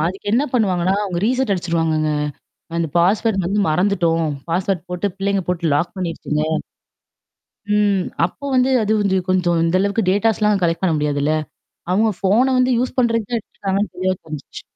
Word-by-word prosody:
அதுக்கு 195 Hz, +2 st, -6 dB
என்ன 245 Hz, +5 st, +3 dB
பண்ணுவாங்கன்னா, 190 Hz, -6 st, +1 dB
அவங்க 180 Hz, -4 st, -3 dB
ரீசெட் 255 Hz, -2 st, +1 dB
அடிச்சுருவாங்கங்க. 165 Hz, -4 st, 0 dB, 0.7 s
அந்த 170 Hz, -1 st, 0 dB
பாஸ்வர்ட் 195 Hz, +3 st, +2 dB
வந்து 200 Hz, +4 st, 0 dB
மறந்துட்டோம். 170 Hz, -1 st, +1 dB, 0.2 s
பாஸ்வர்ட் 180 Hz, +1 st, -1 dB
போட்டு 180 Hz, +3 st, -1 dB
பிள்ளைங்க 200 Hz, -1 st, 0 dB
போட்டு 170 Hz, -3 st, 0 dB
லாக் 150 Hz, +7 st, -1 dB
பண்ணிருச்சுங்க. 165 Hz, -4 st, -2 dB, 1.3 s
ம். 205 Hz, -3 st, +2 dB, 0.2 s
அப்போ 180 Hz, +10 st, -8 dB
வந்து 255 Hz, +1 st, +3 dB
அது 215 Hz, +1 st, +1 dB
வந்து 200 Hz, -2 st, +1 dB
கொஞ்சம் 180 Hz, -2 st, +2 dB
இந்த 165 Hz, +2 st, +2 dB
அளவுக்கு 200 Hz, 0 st, 0 dB
டேட்டாஸ்லாம் 210 Hz, 0 st, +2 dB
கலெக்ட் 165 Hz, +1 st, 0 dB
பண்ண 180 Hz, -3 st, +2 dB
முடியாதுல்ல. 145 Hz, 0 st, 0 dB, 0.6 s
அவங்க 215 Hz, +4 st, +3 dB
ஃபோன 205 Hz, +6 st, +3 dB
வந்து 255 Hz, 0 st, +3 dB
யூஸ் 255 Hz, +1 st, -2 dB
பண்றதுக்கு 230 Hz, -3 st, +2 dB
தான் 240 Hz, -, +1 dB
எடுத்துருக்காங்கன்னு 200 Hz, 0 st, -3 dB
தெளிவா 185 Hz, +1 st, 0 dB
தெரிஞ்சச்சு. 155 Hz, -3 st, -8 dB
190 Hz, 150 wpm, -20 LUFS, 170-210 Hz, 1.3 s, என்ன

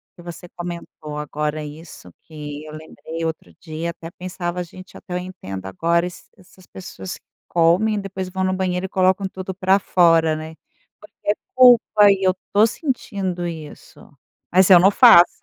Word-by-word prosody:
que 175 Hz, -, -14 dB
você 175 Hz, +1 st, -10 dB
comentou 170 Hz, -3 st, -7 dB
agora 150 Hz, +1 st, -3 dB
isso, 150 Hz, -, -11 dB
que 150 Hz, -2 st, -9 dB
eu 155 Hz, -, -10 dB
lembrei 160 Hz, +1 st, -7 dB
outro 160 Hz, -, -5 dB
dia, 160 Hz, +1 st, -5 dB
até 165 Hz, 0 st, -8 dB
pensava: 180 Hz, 0 st, -5 dB
"Gente, 185 Hz, +2 st, -14 dB
até 180 Hz, -, -10 dB
eu -, -, -1 dB
entendo 170 Hz, -, -7 dB
agora 170 Hz, -, 0 dB
esse 180 Hz, -, -10 dB
essas 185 Hz, -1 st, -20 dB
pessoas 185 Hz, 0 st, -9 dB
que -, -, -19 dB, 0.2 s
comem, 180 Hz, +6 st, +2 dB
depois 190 Hz, -2 st, -6 dB
vão 190 Hz, +1 st, -3 dB
no 185 Hz, -, 0 dB
banheiro 185 Hz, -1 st, -2 dB
e -, -, -6 dB
colocam 190 Hz, +1 st, +1 dB
tudo 190 Hz, 0 st, -7 dB
pra 190 Hz, +1 st, +2 dB
fora". 165 Hz, -4 st, +3 dB
Né. 155 Hz, +1 st, -8 dB, 0.5 s
Porque 205 Hz, 0 st, -4 dB
é -, -, +1 dB, 0.2 s
culpa 235 Hz, -5 st, +6 dB
e 195 Hz, -1 st, +2 dB
eu 185 Hz, -, +4 dB, 0.2 s
tô 210 Hz, +2 st, +6 dB
sentindo 200 Hz, -, -3 dB
isso. 160 Hz, -3 st, -9 dB, 0.4 s
Mas 185 Hz, +1 st, +4 dB
eu 185 Hz, -2 st, +9 dB
não 190 Hz, +3 st, +5 dB
faço, 205 Hz, -6 st, +6 dB
180 Hz, 170 wpm, -21 LUFS, 160-190 Hz, 0.5 s, eu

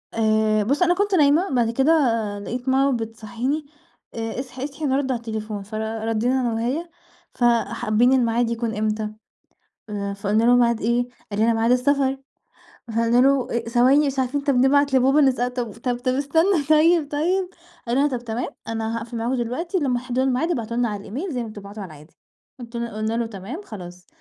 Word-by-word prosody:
آآ، 215 Hz, -1 st, +2 dB
بُص 280 Hz, -, 0 dB
أنا 355 Hz, 0 st, +4 dB
كنت 405 Hz, +2 st, +1 dB
نايمة 305 Hz, +4 st, +4 dB
بعد 240 Hz, -3 st, +1 dB
كده 265 Hz, +6 st, +2 dB, 0.5 s
لقيت 245 Hz, +5 st, -4 dB
ماما 270 Hz, 0 st, +3 dB
بتصحيني 230 Hz, +6 st, -4 dB, 0.5 s
"اصحي، 250 Hz, +3 st, -5 dB
اصحي 285 Hz, +2 st, -5 dB
نرد 270 Hz, -1 st, +1 dB
على 250 Hz, -, 0 dB
التليفون" 220 Hz, -2 st, -5 dB
فردِّينا 220 Hz, +4 st, -1 dB
أنا 240 Hz, -2 st, 0 dB
وهي: 255 Hz, +10 st, -2 dB, 0.4 s
"ف -, -, -4 dB, 0.2 s
حابين 235 Hz, +4 st, +2 dB
الميعاد 240 Hz, -2 st, +2 dB
يكون 230 Hz, -1 st, -2 dB
إمتى؟" 215 Hz, 0 st, -1 dB, 1.1 s
فقلنا 205 Hz, +2 st, +1 dB
له: 245 Hz, +1 st, +5 dB
"ميعاد 235 Hz, -2 st, +3 dB
إيه؟" 240 Hz, +2 st, +1 dB, 0.2 s
قال 205 Hz, -, -3 dB
لنا: 230 Hz, +1 st, +3 dB
"ميعاد 225 Hz, +1 st, +1 dB
السفر"، 270 Hz, +1 st, +2 dB, 0.7 s
فقلنا 230 Hz, +1 st, +1 dB
له: 265 Hz, -3 st, +2 dB
"ثواني 250 Hz, +6 st, +3 dB
مش 275 Hz, -1 st, -2 dB
عارفين 260 Hz, +2 st, 0 dB
طَب 280 Hz, -1 st, +1 dB
نبعت 275 Hz, +2 st, +3 dB
لبابا 265 Hz, +3 st, +4 dB
نسأله، 255 Hz, -3 st, +2 dB
طَب 245 Hz, -3 st, -3 dB
طَب 240 Hz, +2 st, -2 dB
طَب 255 Hz, 0 st, 0 dB
استنى 320 Hz, +5 st, +2 dB
طيب 310 Hz, 0 st, +4 dB
طيب"، 360 Hz, +5 st, 0 dB, 0.4 s
قال 235 Hz, -, 0 dB
لنا: 285 Hz, +2 st, +4 dB
"طَب 255 Hz, -4 st, -3 dB
تمام 235 Hz, +2 st, -3 dB, 0.2 s
أنا 225 Hz, 0 st, -2 dB
هاقفل 230 Hz, +1 st, -6 dB
معاكم 235 Hz, +3 st, -1 dB
دلوقتي 260 Hz, -, -2 dB
لما 255 Hz, -5 st, 0 dB
تحددوا 250 Hz, +1 st, -1 dB
الميعاد 265 Hz, +6 st, +1 dB
ابعتوا 235 Hz, -5 st, -3 dB
لنا 240 Hz, -1 st, +1 dB
على 205 Hz, -1 st, -4 dB
الإيميل 275 Hz, -, -5 dB
زي 245 Hz, -2 st, -2 dB
ما 225 Hz, -, -7 dB
بتبعتوا 205 Hz, 0 st, -9 dB
على -, -, -7 dB
العادي" 150 Hz, +2 st, -16 dB, 0.5 s
قلت 235 Hz, -1 st, -10 dB
قلنا 220 Hz, -1 st, -3 dB
له: 235 Hz, -, 0 dB
"تمام 225 Hz, -, -7 dB
خلاص". 180 Hz, -, -10 dB
245 Hz, 175 wpm, -23 LUFS, 225-275 Hz, 1.1 s, له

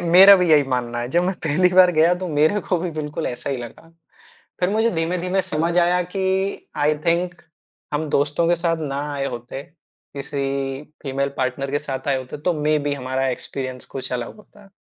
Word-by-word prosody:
मेरा 185 Hz, +4 st, +8 dB
भी 180 Hz, -2 st, +1 dB
यही 150 Hz, -2 st, +7 dB
मानना 120 Hz, -2 st, -1 dB
है, 120 Hz, -, -3 dB
जब 175 Hz, +1 st, +2 dB
मैं 190 Hz, +1 st, 0 dB
पहली 170 Hz, +5 st, +3 dB
बार 185 Hz, -1 st, +7 dB
गया 165 Hz, +3 st, +4 dB
तो 185 Hz, -1 st, -4 dB
मेरे 155 Hz, +7 st, +2 dB
को 180 Hz, -, +2 dB
भी 175 Hz, 0 st, -3 dB
बिल्कुल 155 Hz, +1 st, -4 dB
ऐसा 125 Hz, +3 st, -4 dB
ही 135 Hz, -, -1 dB
लगा। 120 Hz, +7 st, -10 dB, 0.7 s
फिर 180 Hz, +2 st, +2 dB
मुझे 220 Hz, +2 st, +2 dB
धीमे-धीमे 180 Hz, +3 st, -1 dB
समझ 170 Hz, -1 st, -1 dB
आया 175 Hz, +1 st, +3 dB
कि 190 Hz, +2 st, -2 dB
आई 150 Hz, +1 st, +2 dB
थिंक 175 Hz, +1 st, 0 dB, 0.5 s
हम 150 Hz, +1 st, -1 dB
दोस्तों 145 Hz, +4 st, +1 dB
के 175 Hz, -, +3 dB
साथ 165 Hz, -1 st, 0 dB
ना 140 Hz, -, -3 dB, 0.2 s
आए 140 Hz, -1 st, -2 dB
होते, 120 Hz, +2 st, -6 dB
किसी 140 Hz, -4 st, -5 dB, 0.2 s
फीमेल 140 Hz, 0 st, -1 dB
पार्टनर 130 Hz, +2 st, -2 dB
के 145 Hz, -, +1 dB
साथ 135 Hz, -2 st, -5 dB
आए 135 Hz, -1 st, +2 dB
होते, 130 Hz, +3 st, -7 dB
तो 175 Hz, +4 st, 0 dB
मेबी 150 Hz, -1 st, +1 dB
हमारा 130 Hz, 0 st, -2 dB
एक्सपीरियंस 130 Hz, 0 st, -4 dB
कुछ 130 Hz, -, -2 dB
अलग 120 Hz, -1 st, -4 dB
होता। 205 Hz, -1 st, -18 dB
155 Hz, 190 wpm, -22 LUFS, 135-180 Hz, 0.7 s, मेरा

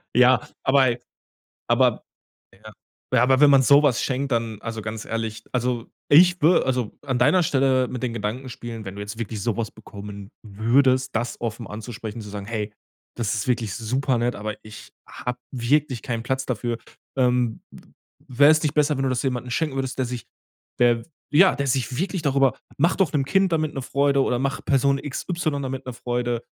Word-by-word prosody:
ja, 125 Hz, +1 st, +5 dB, 0.2 s
aber 135 Hz, 0 st, +4 dB
ey 120 Hz, 0 st, -1 dB, 0.7 s
aber -, -, +3 dB, 0.5 s
ja. 110 Hz, +2 st, -14 dB, 0.5 s
Aber 130 Hz, +1 st, +4 dB
wenn 145 Hz, -1 st, +7 dB
man 135 Hz, -, +6 dB
so 140 Hz, +3 st, +6 dB
was 135 Hz, -5 st, +3 dB
schenkt, 135 Hz, +1 st, -2 dB
dann, 115 Hz, -2 st, -1 dB
also 115 Hz, -1 st, -5 dB
ganz 110 Hz, +1 st, -6 dB
ehrlich, 115 Hz, -1 st, -4 dB
also, 125 Hz, -1 st, -1 dB, 0.2 s
ich 175 Hz, +3 st, +6 dB
wür 165 Hz, 0 st, +4 dB
also, 125 Hz, -4 st, -1 dB
an 130 Hz, -2 st, -1 dB
deiner 150 Hz, +8 st, +4 dB
Stelle 130 Hz, -3 st, +2 dB
mit 125 Hz, -, -6 dB
den 125 Hz, -, -1 dB
Gedanken 115 Hz, +4 st, -4 dB
spielen, 115 Hz, -3 st, -7 dB
wenn 95 Hz, +1 st, -7 dB
du 100 Hz, -, -6 dB
jetzt 105 Hz, +3 st, -7 dB
wirklich 110 Hz, -3 st, -4 dB
so 115 Hz, -, 0 dB
was 115 Hz, -2 st, -2 dB
bekommen 100 Hz, -1 st, -10 dB
würdest, 130 Hz, +5 st, +2 dB
das 120 Hz, +1 st, -2 dB
offen 115 Hz, -1 st, -4 dB
anzusprechen, 110 Hz, 0 st, -7 dB
zu 105 Hz, -, -9 dB
sagen: 100 Hz, -1 st, -6 dB
„Hey, 105 Hz, -2 st, -3 dB, 0.4 s
das 110 Hz, -2 st, -1 dB
ist 105 Hz, -, -3 dB
wirklich 115 Hz, -6 st, 0 dB
super 125 Hz, +3 st, 0 dB
nett, 120 Hz, +1 st, 0 dB
aber 105 Hz, +1 st, -4 dB
ich 110 Hz, -1 st, -12 dB
habe 125 Hz, 0 st, -5 dB
wirklich 130 Hz, 0 st, 0 dB
keinen 115 Hz, -1 st, -3 dB
Platz 130 Hz, +1 st, -2 dB
dafür, 120 Hz, -1 st, -2 dB, 0.4 s
ähm, 125 Hz, -3 st, +1 dB, 0.7 s
wäre 140 Hz, +3 st, +5 dB
es 155 Hz, 0 st, +2 dB
nicht 150 Hz, -1 st, 0 dB
besser, 150 Hz, -1 st, +2 dB
wenn 135 Hz, -, -1 dB
du 135 Hz, -, +1 dB
das 130 Hz, -, 0 dB
jemanden 125 Hz, -2 st, -2 dB
schenken 155 Hz, -2 st, -1 dB
würdest, 135 Hz, -1 st, -3 dB
der 130 Hz, -, +1 dB
sich 120 Hz, -2 st, -6 dB, 0.5 s
der 120 Hz, -1 st, +3 dB, 0.3 s
ja, 185 Hz, +6 st, +6 dB
der 140 Hz, 0 st, -2 dB
sich 130 Hz, -1 st, 0 dB
wirklich 185 Hz, +1 st, -2 dB
darüber 135 Hz, -2 st, +2 dB, 0.2 s
mach 170 Hz, +5 st, +3 dB
doch 190 Hz, -4 st, +1 dB
'nem 140 Hz, -2 st, +1 dB
Kind 190 Hz, +6 st, +2 dB
damit 155 Hz, -2 st, 0 dB
'ne 135 Hz, -, -2 dB
Freude 140 Hz, +1 st, +2 dB
oder 125 Hz, -, 0 dB
mach 135 Hz, +1 st, -2 dB
Person 140 Hz, 0 st, +2 dB
XY 155 Hz, +3 st, -3 dB
damit 135 Hz, 0 st, -5 dB
'ne 125 Hz, -, -5 dB
Freude“, 120 Hz, -1 st, -2 dB
125 Hz, 190 wpm, -23 LUFS, 115-135 Hz, 0.7 s, wenn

